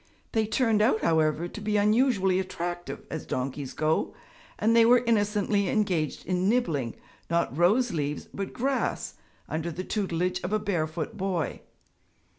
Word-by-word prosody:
They 220 -1 +1
turned 225 -2 +2
out, 220 0 +3
however, 160 +1 +2
to 210 - -9
be 210 0 0
unusually 205 -3 +3
attractive, 175 -2 -4
as 160 - -5
donkeys 135 +1 -3
go, 155 +1 0 0.4
and 225 +2 +2
they 230 - +7
were 240 +1 +5
innocently 205 -3 +1
engaged 185 -8 0
in 185 +1 +1
nibbling, 160 - 0 0.3
not 170 -4 0
rose 210 - +3
leaves, 150 -2 -2
but 195 -1 -4
grass, 270 +2 -1 0.3
under 160 +2 -2
the 180 +3 -5
tutelage 180 -3 -1
of 185 - -3
a - - +4
barefoot 175 -1 -2
boy. 185 -6 -2
190 Hz, 145 wpm, -27 LUFS, 165-215 Hz, 0.4 s, they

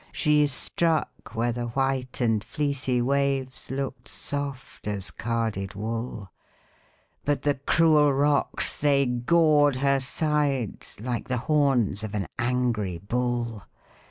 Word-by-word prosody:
She 150 -2 +3
struck 160 +1 0
where 120 +2 +1
the 120 0 -3
white 130 +1 -1
and 110 -3 +2
fleecy 135 -1 -1
waves 135 -1 -1
Look'd 135 0 -4
soft 140 -5 -5
as 100 -2 -1
carded 110 -4 -2
wool, 110 -1 -4 0.9
But 145 0 0
the 145 - +3
cruel 155 -3 +5
rocks, 145 +1 +2
they 140 -1 +3
gored 145 +3 +3
her 140 +1 +2
sides 140 -6 -1
Like 120 +1 -3
the 125 - -1
horns 135 -9 +2
of 110 -1 -5
an 100 - -1
angry 120 -7 0
bull. 120 +2 -2
130 Hz, 120 wpm, -26 LUFS, 115-145 Hz, 0.9 s, cruel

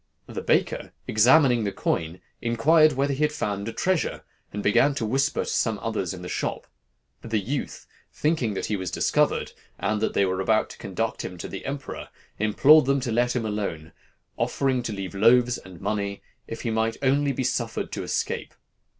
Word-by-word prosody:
The - - -6
baker, - - 0
examining 125 +2 +5
the 100 - -1
coin, 80 -1 -2 0.2
inquired 155 +7 +4
whether 140 +2 0
he 135 - -4
had 150 - +2
found 105 -8 -3
a - - -2
treasure, 185 +6 -1 0.3
and 105 0 -5
began 135 +7 +4
to 115 - -1
whisper 135 +5 +1
to - - -3
some 110 -3 +1
others 105 -5 -2
in 90 -1 -8
the - - -5
shop. - - -3 0.6
The 115 -1 -2
youth, 130 +8 -4 0.3
thinking 150 -9 0
that - - -2
he 105 - -1
was 95 -3 -3
discovered, - - +1 0.3
and 105 +1 -1
that - - -1
they 100 - +4
were 95 0 -1
about 110 +3 +1
to - - -13
conduct 110 +4 -3
him 90 - -6
to - - -6
the 95 - -7
emperor, 140 0 -6 0.3
implored 135 +8 +6
them 140 +1 +2
to 125 -2 -2
let 120 +2 +1
him 120 -3 -1
alone, 100 -7 -3 0.5
offering 135 -2 0
to 115 - -4
leave 95 -2 -5
loaves 120 +4 +4
and 95 -3 -13
money 100 -2 -3 0.2
if 115 - -6
he 115 - -2
might 110 0 0
only 140 +2 +3
be 130 0 -2
suffered 120 -2 -2
to - - -4
escape. - - -3
115 Hz, 190 wpm, -25 LUFS, 100-135 Hz, 0.6 s, implored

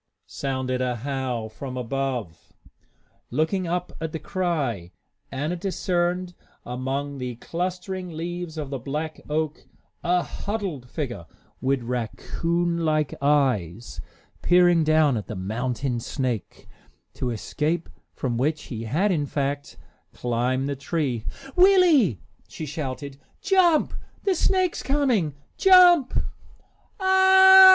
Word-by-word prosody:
"Ow - - -58
w - - -55
w - - -58
ch!" - - -19
sounded 130 -2 -2
a 125 -1 0
howl 130 -5 -2
from 130 +4 -7
above. 125 - -3 0.8
Looking 160 +7 0
up 180 +1 -2
at 160 -1 -3
the - - -1
cry, 145 - -2 0.4
Anna 150 +6 -2
discerned 180 -1 -1 0.3
among 135 +3 -3
the 125 -1 -4
clustering 180 - -4
leaves 170 0 -5
of 145 -3 -4
the 135 - -3
black 150 +5 -4
oak 155 0 -2 0.4
a 175 +1 +2
huddled 190 - -4
figure, 120 - -5 0.3
with 135 -1 +1
raccoon 170 +8 -1
like 155 -3 +1
eyes, 125 - +1 0.4
peering 175 -2 +5
down 155 -4 +3
at 105 - -5
the 110 - -5
mounting 120 +6 -2
snake, 125 -3 -4 0.5
to 125 - -3
escape 150 +8 -2 0.3
from 120 -3 -2
which 150 +3 0
he 115 -2 -6
had, 175 - +1
in 150 -5 0
fact, 140 0 -3 0.4
climbed 125 +3 -1
the 140 - -2
tree. 135 -5 -2 0.3
"Willie," 355 - +5 0.3
she 160 - -7
shouted, 140 -2 -5 0.2
"jump! 360 -5 +3 0.3
The 390 - +2
snake's 370 0 +1
coming! 250 - +1 0.2
Jump!" 355 -7 +6
145 Hz, 120 wpm, -25 LUFS, 125-175 Hz, 0.8 s, Jump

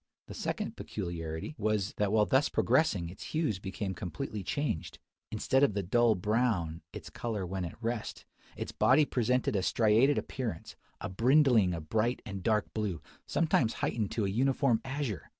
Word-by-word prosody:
The - - -9
second - - -3
peculiarity 80 - -5
was, 105 -2 0
that 105 -1 +1
while 105 -1 +4
thus 130 +9 +3
progressing 100 - +2
its 95 - -11
hues 155 - -1
became 95 0 -4
completely 105 - -5
changed. 120 - -3 0.3
Instead 130 +5 +1
of 125 -8 +3
the 100 - 0
dull 115 +4 +3
brown, 100 -5 0
its - - -9
colour 110 -5 -3
when 95 0 -3
at 85 +8 -9
rest, 115 -1 -3 0.3
its - - -4
body 145 +4 +4
presented 125 0 +1
a 95 - +2
striated 115 +8 +3
appearance, 115 -11 -4 0.2
a - - -4
brindling 115 - +4
of 80 -2 -7
bright 115 +3 +1
and 100 -4 -5
dark 105 +1 0
blue, 105 -6 -2 0.3
sometimes 140 -8 +2
heightened 110 -4 -1
to 110 - 0
a - - 0
uniform 130 +2 +2
azure! 130 - -4
110 Hz, 165 wpm, -31 LUFS, 95-125 Hz, 0.3 s, while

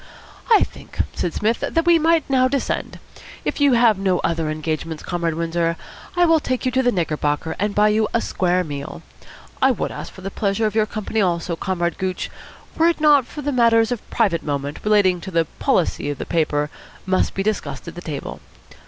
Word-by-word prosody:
"I 445 -3 +6
think," - - -10 0.2
said 175 - -2
Psmith, 220 +6 0
"that 330 0 0
we 340 -1 +5
might 325 -1 +2
now 260 -2 +3
descend. 275 0 -2 0.5
If - - -2
you 285 -2 +5
have 230 -4 +4
no 190 -2 +2
other 165 -2 0
engagements, 155 +1 -3
Comrade 170 -2 -2
Windsor, 165 0 -1 0.4
I 350 0 +4
will 330 -1 +4
take 255 -3 -2
you 255 - +1
to 260 +1 +2
the 245 -1 +2
Knickerbocker, 155 -4 -1
and 205 +1 -1
buy 210 +1 +5
you 215 0 +2
a 235 - +2
square 180 -4 0
meal. 145 -4 -7 0.6
I 265 - +5
would 250 - -1
ask - - -7
for 190 - -13
the 195 +1 -5
pleasure 200 +2 0
of 215 - 0
your 215 -1 +2
company 215 0 -2
also, 170 -2 0
Comrade 175 -1 -2
Gooch, 185 -1 -3 0.5
were 325 - +5
it 340 - -1
not 295 -4 +5
that 290 -1 -2
matters 230 -3 +4
of 245 - -4
private 195 -8 +1
moment, 145 0 -3
relating 200 -4 +3
to 190 - -7
the 165 -2 +1
policy 160 -4 +1
of 145 - -3
the - - -5
paper, 150 -3 0 0.3
must 185 0 +1
be 195 - -1
discussed 210 -3 -3
at 170 - -6
the 175 - -8
table. 150 -5 -6
195 Hz, 200 wpm, -21 LUFS, 170-245 Hz, 0.6 s, I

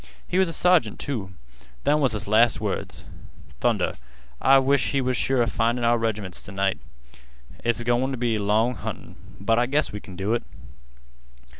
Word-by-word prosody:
He 185 - 0
was 190 - +4
a 165 - -4
sergeant, 175 - +3
too. 100 -9 -4 0.5
Them 150 +1 +3
was 135 -6 +2
his 105 0 -4
last 110 +3 +4
words. - - -4 0.6
Thunder, - - +1 0.5
I 135 0 +6
wish 135 0 +2
we 140 - +1
was 130 0 0
sure 130 -1 +2
'a - - +1
findin' 115 +3 0
our 120 0 +3
reg'ments 110 -5 -3
t' - - -9
night. 95 0 0 0.8
It's 120 0 0
goin' 120 +2 +1
t' 130 - -3
be 115 -2 0
long 110 +4 +2
huntin'. - - -7 0.2
But 115 +4 +2
I 120 - +2
guess 145 +3 +1
we 105 - -6
kin 95 -2 -12
do 95 +4 -1
it." 120 - 0
120 Hz, 180 wpm, -24 LUFS, 105-130 Hz, 0.8 s, I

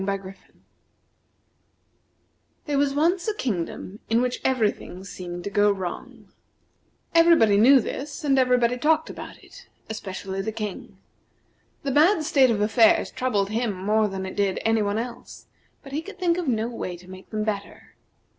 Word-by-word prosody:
There 295 - -2
was 280 -1 +1
once 345 +5 +1
a 430 - 0
kingdom 200 - -4
in 225 +1 +3
which 250 0 -1
every 235 -6 +2
thing 185 +1 -11
seemed 175 -2 -7
to 200 - -5
go 205 +1 +4
wrong. 190 -3 -6 0.8
Everybody 330 -11 +5
knew 260 +6 +7
this, 290 +7 -5
and 275 -2 +3
everybody 250 -1 +2
talked 315 +3 +2
about - - -10
it, - - -15 0.2
especially 195 -2 -5
the 220 - -3
King. 210 -3 -6 0.9
The 275 - -1
bad 315 +5 +4
state 280 -5 +4
of 215 -3 0
affairs 220 +1 +4
troubled 210 -6 -1
him 225 -1 -1
more 210 +3 +1
than 190 -1 -5
it 190 - -7
did 200 -2 0
any 225 0 +3
one 205 0 -1
else, 235 +1 -7 0.4
but 275 - -11
he 295 +3 -2
could 400 +3 -11
think 355 -2 +1
of 345 - -4
no 225 -3 0
way 185 -7 -5
to 180 +1 -17
make 185 0 -12
them 215 -1 -2
better. 205 -2 -5
225 Hz, 160 wpm, -24 LUFS, 200-280 Hz, 0.9 s, knew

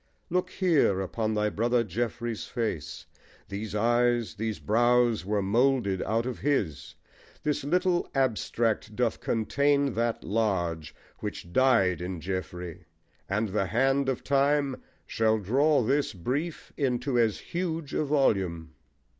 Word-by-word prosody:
Look 180 +1 0
here 160 - +2
upon 110 +3 -2
thy 105 0 +1
brother 120 +3 +1
Geoffrey's 115 +2 -3
face 85 - -4 0.4
These 100 +1 -5
eyes, 120 +1 +2
these 110 0 -3
brows 120 -1 +2
were 105 0 0
moulded 115 -2 +2
out 115 +3 0
of 130 -1 -4
his: 105 - -1 0.5
This 150 -2 0
little 180 +4 +1
abstract 115 -4 0
doth 120 -1 0
contain 140 +4 +1
that 115 0 -1
large 90 -8 -1 0.2
Which 85 - -6
died 115 -10 +3
in 90 -1 -4
Geoffrey; 90 -1 -5 0.4
and 105 +2 0
the 95 0 0
hand 135 +7 +2
of 130 - -2
time 140 -1 +1 0.2
Shall 110 0 +1
draw 135 +7 +2
this 140 +2 +1
brief 140 - -4
into 130 -2 0
as 110 -3 +2
huge 165 -4 -4
a - - +1
volume. 95 - 0
115 Hz, 130 wpm, -28 LUFS, 100-135 Hz, 0.5 s, died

